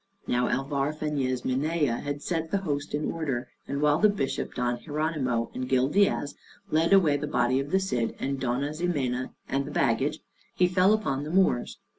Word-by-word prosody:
Now 125 0 +1
Alvar 140 +2 0
Fañez 140 -5 -2
Minaya 145 -1 +1
had 145 0 -4
set 165 -2 -2
the 200 - +1
host 145 -2 -2
in 150 - -1
order, 140 -7 -3 0.2
and 140 +1 -2
while 150 +1 +4
the 215 - +6
Bishop 200 -10 -2
Don 120 -1 -1
Hieronymo 145 -6 -1
and 130 0 -4
Gil 130 0 +3
Diaz 195 -5 +2 0.4
led 160 +3 +2
away 170 -7 +5
the 150 +1 -4
body 130 -2 +2
of 140 +1 -3
the 190 - +3
Cid, 125 -12 -1
and 135 0 -2
Dona 130 +4 -1
Ximena, 140 -7 -1 0.2
and 135 +1 0
the - - -6
baggage, 145 +2 +1 0.4
he 180 - +4
fell 185 +3 +4
upon 140 -11 0
the 150 - -5
Moors. 180 -8 +2
145 Hz, 185 wpm, -27 LUFS, 130-160 Hz, 0.4 s, the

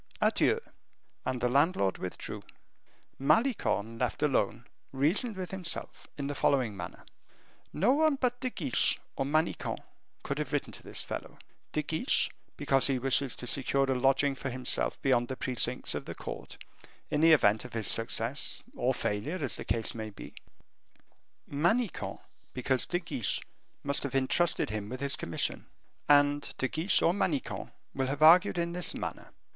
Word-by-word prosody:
Adieu!" 450 - +2 0.7
And 130 -1 -2
the 125 - +2
landlord 140 - +2
withdrew. 90 - -6 0.8
Malicorne, 140 - +1
left 125 +4 -1
alone, 120 -5 0 0.3
reasoned 170 - +2
with 185 -1 -5
himself 185 -3 -2
in 140 - -3
the 145 - -2
following 130 -6 +1
manner: 90 -2 -8 0.7
"No 195 +10 +2
one 310 0 +3
but 250 -2 -1
De 255 - -2
Guiche 145 - +2 0.2
or 135 - -1
Manicamp 155 +3 0 0.5
could - - -3
have - - -4
written - - -1
to - - -7
this - - -5
fellow; - - -7 0.3
De 150 - -1
Guiche, 160 - +1 0.3
because 135 -2 +3
he 135 -2 +1
wishes 135 0 +2
to - - -6
secure 135 +2 +2
a - - +3
lodging 135 +2 +2
for 135 0 -5
himself 125 0 0
beyond 120 -3 +2
the 130 - -4
precincts 125 -2 +1
of - - -4
the - - -7
court, - - -8 0.5
in 150 - +1
the 165 0 +6
event 110 -7 +4
of - - -10
his 110 -4 -2
success 115 +4 +2
or 125 +1 0
failure, 115 - -2
as 140 -6 -1
the - - -6
case 115 -1 0
might 110 -2 -7
be; - - -10 1.1
Manicamp, 175 +10 0 0.4
because 130 0 +1
De 175 - 0
Guiche 145 - -1 0.4
must 140 0 0
have 140 -2 -4
intrusted 135 0 +2
him 105 -1 -4
with 130 - -6
his 140 0 +1
commission. 85 - -3 0.4
And 145 0 +4
De 130 - 0
Guiche 160 +8 +2
or 170 - +4
Manicamp 180 -8 -2 0.2
will 135 -1 -1
have 145 +3 -1
argued 180 +4 +7
in 170 0 -1
this 180 0 -1
manner. - - -6
140 Hz, 160 wpm, -30 LUFS, 125-165 Hz, 1.1 s, argued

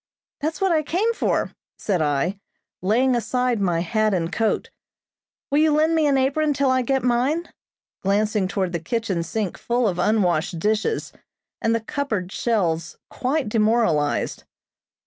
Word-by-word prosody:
"That's 310 +1 -2
what 385 -1 +2
I 315 -2 +3
came 380 +10 0
for," - - 0 0.3
said 185 -5 -1
I, 155 +6 0 0.4
laying 245 +7 +2
aside 250 -1 0
my 175 -3 +1
hat 215 +3 +1
and 170 +1 -2
coat. 225 -1 0 0.8
"Will 285 - +3
you 310 0 +4
lend 310 +2 +3
me 315 -2 +3
an 275 -1 +3
apron 290 +3 +1
till 275 -1 +2
I 260 0 +2
get 265 +1 0
mine?" 260 +8 +1 0.5
glancing 205 0 +1
toward 190 -1 -1
the 170 - -1
kitchen 195 0 -2
sink 200 +2 -3
full 240 0 +1
of 180 -3 -2
unwashed 180 -5 +1
dishes, 215 - -1 0.5
and 225 0 +2
the - - +1
cupboard 220 -7 -3
shelves 170 -10 -1
quite 270 +1 -1
demoralized. 210 -9 +1
225 Hz, 150 wpm, -23 LUFS, 185-270 Hz, 0.8 s, you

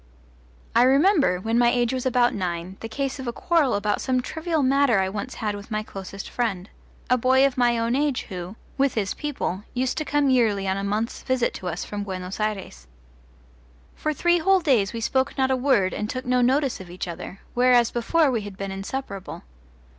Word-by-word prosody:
I 235 - +6
remember, 275 - +4
when 225 +5 0
my 240 -1 +5
age 240 0 +1
was 260 0 -1
about 245 -1 +3
nine, 180 -1 -3
the 225 - -7
case 275 +4 -3
of 260 - -6
a - - 0
quarrel 315 0 +1
about 205 +1 0
some 255 -1 +1
trivial 320 +4 -2
matter 270 -4 +3
I 190 0 +1
once 205 +6 -5
had 210 -2 -2
with 205 +2 -9
my 215 -1 -2
closest 195 -1 -8
friend, 205 -6 -3 0.4
a 250 - +3
boy 260 +3 +4
of 275 -2 0
my 240 -2 +3
own 230 +1 0
age 285 -2 0
who, 180 0 -7 0.2
with 275 -2 +2
his 205 -3 -1
people, 260 -10 -3
used 255 +3 0
to - - -1
come 290 -2 +1
yearly 215 -6 +2
on 190 - +1
a 195 - -3
month's 210 +3 -2
visit 255 -2 0
to 185 - -6
us 175 0 -3
from 205 -1 -4
Buenos 185 -1 -6
Ayres. 195 - -4 1.1
For 310 - -2
three 345 +4 +2
whole 385 +3 +3
days 240 - +2
we 230 - -5
spoke 265 +4 0
not 265 -1 +2
a - - +3
word 250 -8 +2
and 210 0 -3
took 255 +1 -4
no 250 0 +2
notice 265 +1 +2
of 185 -2 -10
each 180 +1 -5
other, 180 +3 -7
whereas 245 -1 +4
before 285 +5 +2
we 230 -3 0
had 200 -2 -9
been 195 -1 -4
inseparable. 195 0 -6
240 Hz, 205 wpm, -24 LUFS, 200-265 Hz, 1.1 s, I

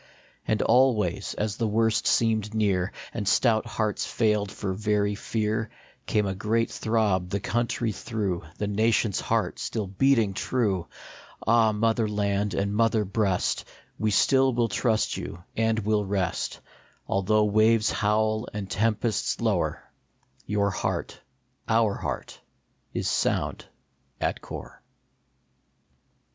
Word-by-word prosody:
And 110 - +1
always, 110 -8 +2
as 105 -1 -2
the 115 - 0
worst 110 +1 +1
seemed 110 -2 +1
near, 100 -3 +1 0.2
And 105 -4 -3
stout 110 +1 +3
hearts 110 -2 -1
failed 105 -3 0
for 95 -2 -3
very 105 0 0
fear, 110 +1 -2 0.4
Came 105 -1 +2
a 95 - -1
great 110 +4 0
throb 105 -5 0
the 100 - -1
country 120 +2 -1
through, 100 -4 -3 0.2
The 105 - -2
nation 110 +1 +2
s - - -1
heart 110 -5 -1
still 110 -3 -2
beating 110 +1 +2
true! 95 -5 -1 0.6
Ah, 115 -1 +4
mother 110 +1 +1
land 100 -1 0
and 100 +1 0
mother 110 -1 +2
breast, 100 -2 0 0.3
We 110 - +1
still 130 +5 +4
will 120 -1 +1
trust 110 +1 0
you 85 - -7
and 110 0 +1
will 105 -1 +1
rest; 95 -3 -2 0.4
Although 105 +2 +2
waves 110 +1 +3
howl 110 +2 +1
and 100 -2 -4
tempests 110 +3 0
lower, - - 0 0.6
Your 100 0 +1
heart, - - -3 0.5
our 110 -2 +3
heart, - - -5 0.5
is - - -2
sound - - 0 0.5
at - - -1
core. - - -9
105 Hz, 130 wpm, -26 LUFS, 100-115 Hz, 0.6 s, Ah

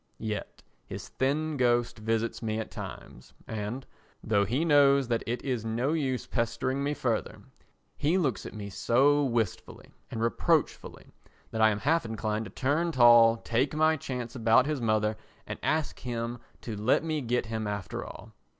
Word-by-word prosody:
Yet 110 -2 -5 0.2
his - - -8
thin 150 +3 -1
ghost 120 -2 +1
visits 115 +1 -1
me 110 -1 -2
at 110 - -5
times 60 - -9
and, 110 +4 -5 0.4
though 100 -2 +2
he 130 - 0
knows 140 -4 +5
that 115 -1 +1
it 120 +2 -3
is 125 -5 -2
no 120 +6 -1
use 135 -6 -1
pestering 130 +3 -1
me 145 +1 -1
further, 115 -6 -2 0.5
he 160 +6 +2
looks 135 - 0
at - - -10
me 100 -1 -6
so 140 +8 +3
wistfully 120 -5 -3 0.2
and 115 - -5
reproachfully 115 -2 0 0.4
that 110 - -2
I 110 - +7
am 105 -1 -2
half 160 +7 +2
inclined 110 -1 -3
to 95 - -10
turn 150 +9 0
tall, 120 -4 +7
take 125 +6 -1
my 155 +1 +4
chance 125 -5 -5
about 115 +1 +4
his 150 -3 -2
mother 110 -1 +1 0.3
and - - -6
ask 155 -1 -1
him 120 -1 -4 0.2
to 115 - -5
let 110 +8 +2
me 155 -2 -1
get 125 0 0
him 110 -1 -3
after 100 -3 -4
all. - - -11
120 Hz, 170 wpm, -28 LUFS, 110-140 Hz, 0.5 s, I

